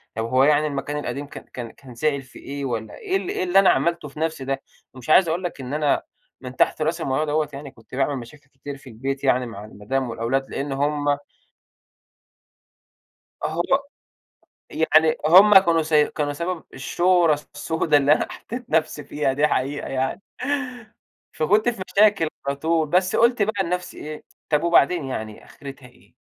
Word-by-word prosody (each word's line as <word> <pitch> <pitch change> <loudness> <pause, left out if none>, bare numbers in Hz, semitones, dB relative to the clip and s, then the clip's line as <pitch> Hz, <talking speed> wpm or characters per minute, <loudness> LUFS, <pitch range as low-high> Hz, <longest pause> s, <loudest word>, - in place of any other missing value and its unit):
طب 110 +1 -2
هو 130 +3 +3
يعني 150 +1 +4
المكان 145 0 -3
القديم 145 -1 -4
كان 145 - -10
كان 120 -3 -6
كان 130 -3 -15
زعل 140 +2 0
في 130 - -15
إيه 140 0 -6
والّا 110 -4 -4
إيه 190 - -1
ال 195 -2 -5
إيه - - -1
اللي 185 +1 +4
أنا 195 - +5
عملته 170 -3 +1
في 145 +1 -11
نفسي 160 -4 -2
ده! 135 0 -2 0.3
مش 130 +2 -10
عايز 175 +3 +6
أقول 170 +3 -1
لك 175 -6 -4
إن 130 +1 -6
أنا 150 -1 +1 0.4
من 130 -1 -8
تحت - - +2
رأس 165 +2 -1
الموضوع 135 +1 0
دوّة 155 0 0
يعني 140 0 -8
كنت 115 +1 -14
باعمل 140 +2 0
مشاكل 135 +4 -12
كتير 140 0 -9
في 135 -1 -14
البيت 135 +4 -4
يعني 130 -2 +2
مع 105 -3 -8
المدام 120 +5 -3
والأولاد 120 +4 -2
لإن 140 +1 -4
هم 145 +1 0 2.3
أهأ 160 +2 -1 1.1
يعني 160 0 +3
هم 190 +5 +8
كانوا 170 -3 +2
س 160 0 -5
كانوا 150 -1 +2
سبب 170 +2 -4
الشورة 170 +2 +2 0.2
السودة 160 -2 +1
اللي 145 0 +3
أنا - - -1
حطّيت 245 +1 -8
نفسي 155 -2 0
فيها 145 -1 -1
دي 145 +3 +3
حقيقة 140 +1 -2
يعني. 135 +7 -2 1.1
فكنت 210 +9 +2
في 230 -6 -5
مشاكل 200 -4 +4 0.2
على 140 - 0
طول. 160 +1 0
بس 185 +3 +2
قُلت 235 0 +3
بقى 205 -1 +1
لنفسي 180 0 -4
إيه، 155 0 -8 0.3
طب 150 +1 +2
وبعدين 170 -1 +3
يعني 110 -5 -6
آخرتها 140 -2 -11
إيه؟ 125 - -24
145 Hz, 175 wpm, -23 LUFS, 135-170 Hz, 2.3 s, هم